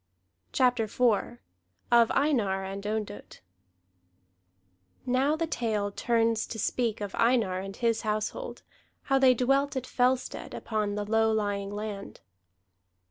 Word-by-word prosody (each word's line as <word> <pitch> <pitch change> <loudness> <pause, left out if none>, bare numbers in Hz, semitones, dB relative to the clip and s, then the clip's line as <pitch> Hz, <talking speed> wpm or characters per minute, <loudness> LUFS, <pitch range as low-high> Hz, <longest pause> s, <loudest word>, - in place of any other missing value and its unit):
CHAPTER 245 -3 +2
IV 240 +1 +1 0.5
OF 235 -1 +6
EINAR 225 -10 +1
AND 195 +1 -5
ONDOTT 210 -1 -5 1.6
Now 265 +4 +2
the 330 +1 -1
tale 215 -9 -1
turns 230 +1 +1
to 225 - -6
speak 225 0 -1
of 205 -2 -4
Einar 230 -6 +2
and 195 +1 -6
his 230 -2 0
household, 215 - -3 0.4
how 270 -1 +2
they 260 -1 +6
dwelt 275 +4 +1
at 260 -1 -2
Fellstead, 255 0 -1
upon 210 -2 -2
the 210 0 -2
low 220 +1 +2
lying 205 -2 -1
land. 205 -1 -6
225 Hz, 125 wpm, -28 LUFS, 205-250 Hz, 1.6 s, OF